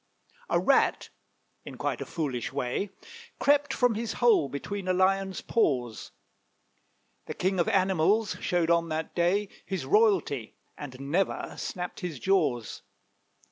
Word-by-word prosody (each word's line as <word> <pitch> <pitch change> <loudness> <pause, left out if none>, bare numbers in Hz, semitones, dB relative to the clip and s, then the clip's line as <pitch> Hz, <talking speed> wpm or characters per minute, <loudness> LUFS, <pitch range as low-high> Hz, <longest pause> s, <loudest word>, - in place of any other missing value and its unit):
A - - +3
Rat, - - +2 0.5
in - - -9
quite - - -2
a - - -5
foolish 135 -8 -3
way, 135 +8 -2 0.5
Crept 285 0 +3
from 245 -2 +2
his 220 +1 -3
hole 230 - +3
between 195 +7 -5
a 185 - +2
Lion's 190 +1 +1
paws; 125 - 0 1.2
The 155 - -5
king 185 0 0
of 170 - +2
animals 195 +3 +2
showed 175 -2 +1
on 170 0 +2
that 160 0 -3
day 185 +4 +1 0.2
His 190 -8 -4
royalty, 175 - +2 0.2
and 130 -3 -9
never 155 +8 -1
snapped 180 -1 -5
his 175 -5 -5
jaws. 150 -9 0
180 Hz, 135 wpm, -28 LUFS, 145-200 Hz, 1.2 s, A